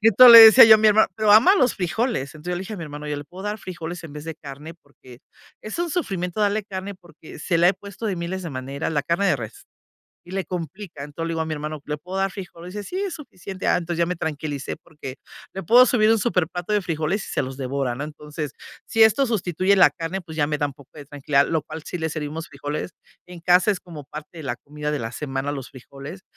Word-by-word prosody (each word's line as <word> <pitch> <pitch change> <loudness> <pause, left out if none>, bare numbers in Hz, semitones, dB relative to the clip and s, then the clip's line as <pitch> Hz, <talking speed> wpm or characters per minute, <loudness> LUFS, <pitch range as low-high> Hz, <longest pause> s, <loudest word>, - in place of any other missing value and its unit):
y 215 - +2
entonces 240 +3 +9
le 230 - +13
decía 225 +3 +11
yo 220 -1 +9
a - - -4
mi 215 - +3
hermano, 215 +1 +5
pero 215 -1 +4
ama 255 - +7
los 255 - +2
frijoles, 185 - -2
entonces 155 +4 -6
yo - - -1
le - - -4
dije 195 +3 -6
a - - -8
mi 170 - -6
hermano: 150 0 -8
"¿Yo 150 - -2
le 145 - -7
puedo 180 +6 -11
dar 210 +1 -3
frijoles 175 -3 -7
en 155 - -9
vez 150 - -8
de 160 -1 -6
carne?", 145 +3 -10
porque 130 -3 -17 0.4
es 215 - -6
un 345 -1 -1
sufrimiento 195 - -2
darle 210 +1 +1
carne 195 0 -6
porque 170 -5 -14
se 170 +1 0
le 170 - +5
ha - - +4
puesto 200 +3 -8
de 200 - -1
miles 180 +2 -4
de 165 - -5
maneras 135 +4 -4
la 145 -2 0
carne 170 +7 0
de 185 - +3
res, 115 -4 -9 0.6
y - - -10
le 190 -1 -2
complican, 170 -2 -7
entonces 155 +3 -5
le - - -3
digo 165 - -2
a - - -4
mi 160 - -4
hermano: 150 0 -5
"¿Le 150 - -3
puedo 180 +5 -6
dar 195 0 0
frijoles?", 180 -1 -9
dice: 205 -1 -6
"Sí 365 - -6
es 390 -3 -3
suficiente", 195 - -7
ah - - +4
entonces 175 -1 -3
ya 170 - +2
me 180 +1 -3
tranquilicé 150 -3 -4
porque 150 -5 -10 0.4
le 190 - -5
puedo 245 +8 +6
subir 220 -3 +3
un 225 - +4
superplato 180 -4 -1
de 210 -1 +2
frijoles 165 +4 -2
y - - -7
se - - 0
los 130 0 -6
devora, 135 -1 -2
¿no?, 130 - -6
entonces 150 -1 -7 0.3
si 225 - +3
esto 220 +5 +4
sustituye 190 -3 +1
la 190 - +7
carne 170 +3 -5
pues 160 -3 -11
ya 145 -2 +2
me 150 -1 -1
da 145 - +1
un 145 - -8
poco 140 -2 -18
de 150 -2 -10
tranquilidad, 140 0 +1
lo 160 -3 -1
cual 155 +1 -9
si - - -5
le 160 -1 -2
servimos 155 +1 -5
frijoles 145 +5 -5 0.4
en 180 -1 -11
casa, 180 +4 +4
es 200 - -1
como 165 -4 -10
parte 150 +4 -10
de - - -7
la 120 -3 -3
comida 150 +3 -6
de 150 - -1
la 115 -1 -5
semana, 135 +1 -3
los 135 -3 -7
frijoles, 140 +7 -11
170 Hz, 260 wpm, -23 LUFS, 150-195 Hz, 0.6 s, le